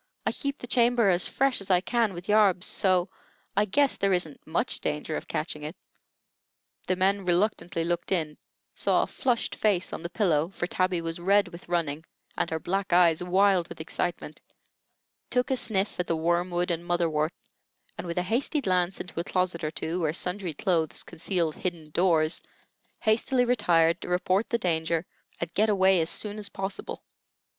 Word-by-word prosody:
I - - +2
keep 280 0 -3
the - - -8
chamber 240 -3 +3
as 175 0 +2
fresh 270 -4 +1
as 195 - -8
I 180 -2 +5
can 225 0 0
with 175 +2 -8
yarbs, 205 -4 +4
so 185 -2 +2 0.4
I 205 +1 +3
guess 275 +7 +2
there 195 -1 +2
isn't 170 -5 -3
much - - 0
danger - - -3
of - - -5
catching - - -3
it." - - -6 1.1
The 185 - +2
men 195 +2 +1
reluctantly 175 -2 0
looked 175 +2 -2
in, 155 -5 -1 0.3
saw - - +2
a - - -1
flushed 245 -3 -1
face 195 -4 0
on - - -5
the 170 - -5
pillow 170 -5 +1
(for - - -2
Tabby 185 -1 0
was 165 0 -4
red 200 +3 +3
with 170 0 -12
running, 160 -3 -1 0.3
and - - -1
her 160 - -2
black 195 +3 -2
eyes 170 -2 +5
wild 185 0 +3
with - - -10
excitement), 160 -1 -4 0.9
took 250 +1 0
a - - +3
sniff 205 -6 -1
at 180 - -1
the 165 - +1
wormwood 175 +2 0
and 170 0 -2
motherwort, 170 -2 0 0.6
and - - -6
with 170 - -4
a 180 - +2
hasty 245 - +1
glance 185 -6 0
into 175 -2 -6
a - - 0
closet 180 -2 -1
or 155 - 0
two 165 +2 -3
where 155 -3 0
sundry 180 -2 -2
clothes 165 -3 0
concealed 170 -1 -2
hidden 165 -4 -5
doors, 165 -2 +2 0.6
hastily 245 +3 +3
retired 175 -9 +3
to - - -7
report 185 +4 +1
the 235 - +1
danger 165 -3 0 0.3
and 170 -1 -4
get 215 +4 +2
away 190 -3 +4
as 160 - -1
soon 210 0 -2
as 205 -1 -4
possible. 195 +1 -5
180 Hz, 180 wpm, -27 LUFS, 170-200 Hz, 1.1 s, I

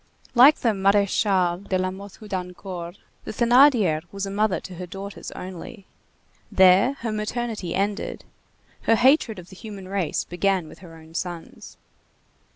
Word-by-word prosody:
Like 265 +5 +8
the 235 - 0
Maréchale 195 -2 +1
de 185 - +2
La 185 0 -1
Mothe 195 +1 -10
Houdancourt, 180 -3 -6 0.3
the - - -9
Thénardier 235 - +4
was 200 0 -4
a 195 - -5
mother 205 -1 +1
to 185 - -10
her 180 0 -6
daughters 195 +2 -8
only. 185 +3 -9 0.7
There 190 +7 +5
her 230 -1 -2
maternity 215 -3 -3
ended. 200 +2 -2 0.6
Her 225 - +5
hatred 250 -2 +3
of 180 -1 -11
the - - -11
human 200 -2 -9
race 190 -4 -1
began 180 -1 0
with - - -14
her 170 -3 -13
own 160 0 -15
sons. 170 -1 -7
195 Hz, 150 wpm, -24 LUFS, 180-215 Hz, 0.7 s, Like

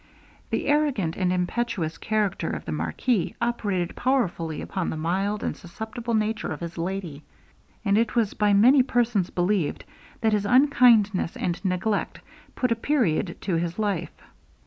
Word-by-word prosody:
The - - -1
arrogant 280 - +1
and 185 -1 0
impetuous 180 -2 -2
character 210 -3 -1
of - - -5
the - - -4
marquis 235 -9 -1
operated 205 -7 -1
powerfully 180 - 0
upon 190 -2 -3
the - - -4
mild 195 +6 -1
and - - -2
susceptible 225 +5 -5
nature 215 -2 -1
of 155 - -4
his 170 0 -6
lady: 170 -4 -4 0.6
and 200 +1 +3
it 230 +1 0
was 225 -4 +1
by 210 -1 +2
many 245 +7 +6
persons 235 -7 +1
believed, 180 -3 0 0.4
that 220 -2 +2
his 205 -1 +1
unkindness 235 - +4
and 175 +2 -2
neglect 195 +3 -1 0.4
put 250 -2 0
a - - +4
period 225 - 0
to 175 -4 0
her 170 0 -1
life. 195 -7 -2
205 Hz, 150 wpm, -25 LUFS, 175-235 Hz, 0.6 s, many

